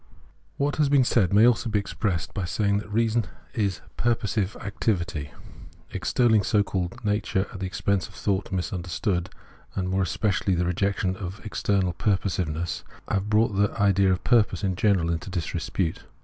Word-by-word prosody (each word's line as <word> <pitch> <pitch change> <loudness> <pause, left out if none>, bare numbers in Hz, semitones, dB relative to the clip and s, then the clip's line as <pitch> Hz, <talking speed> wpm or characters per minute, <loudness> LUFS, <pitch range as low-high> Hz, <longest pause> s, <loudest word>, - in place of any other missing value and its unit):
What 145 +1 0
has 150 -2 +3
been 140 -2 +5
said 105 -7 +2
may 105 +3 +6
also 120 0 +3
be 105 - +1
expressed 100 -3 -2
by 95 - -2
saying 100 +3 +1
that 105 - -9
reason 115 0 +2 0.3
is 100 -5 -1 0.2
purposive 105 -4 0
activity. 95 -7 -2 0.6
Extolling 115 -4 +3
so 105 +1 +2
called 95 +2 -4
nature 105 -2 +1
at 95 - -7
the 95 - -2
expense 95 +1 0
of - - -17
thought 100 -1 -1
misunderstood, 90 -1 -2 0.5
and 90 -1 -1
more 95 +1 +1
especially 95 0 +1
the 90 +1 +1
rejection 95 +1 0
of 95 +1 -6
external 100 -4 0
purposive 95 -2 0
ness, 80 +3 -3 0.3
have 100 +1 0
brought 110 -1 +3
the 100 +1 +1
idea 100 -1 +4
of 90 - -1
purpose 105 -5 +3
in 95 -2 0
general 90 -4 +2
into 85 +3 -3
disrepute. 85 -1 -2
100 Hz, 165 wpm, -26 LUFS, 90-105 Hz, 0.6 s, may